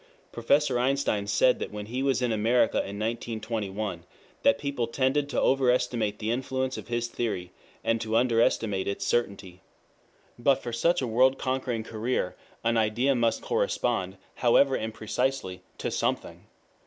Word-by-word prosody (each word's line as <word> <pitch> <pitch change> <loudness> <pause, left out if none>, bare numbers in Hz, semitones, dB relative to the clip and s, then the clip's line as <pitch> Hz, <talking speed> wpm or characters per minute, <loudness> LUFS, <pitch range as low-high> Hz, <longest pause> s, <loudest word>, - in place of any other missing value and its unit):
Professor 140 -4 +2
Einstein 125 -6 0
said 100 +5 +3
when 105 0 -6
he 125 +5 -3
was 135 -2 +1
in 120 - +1
America 115 +2 +2
in 100 +1 -2
1921 110 -4 -3 0.4
that 140 - +4
people 140 -5 -2
tended 135 +4 0
to - - 0
overestimate 125 -5 +2
the 110 +1 -2
influence 130 +1 -2
of - - -8
his 120 0 -1
theory, 105 -7 -3 0.3
and 115 -1 +1
to 110 0 -2
under 115 -2 +3
estimate 100 -5 +1
its 100 - -2
certainty.] 100 -6 -2 0.8
But 135 +3 +4
for 120 -3 -7
such 170 +6 +2
a - - -1
world 130 +4 +3
conquering 130 -4 -2
career 110 -3 -2 0.3
an 115 0 +2
idea 115 +5 +2
must 115 -3 +1
correspond, 120 - -1 0.2
however 130 +2 +4
imprecisely, 110 -1 -2 0.2
to - - -3
something. - - -2
120 Hz, 145 wpm, -27 LUFS, 110-130 Hz, 0.8 s, that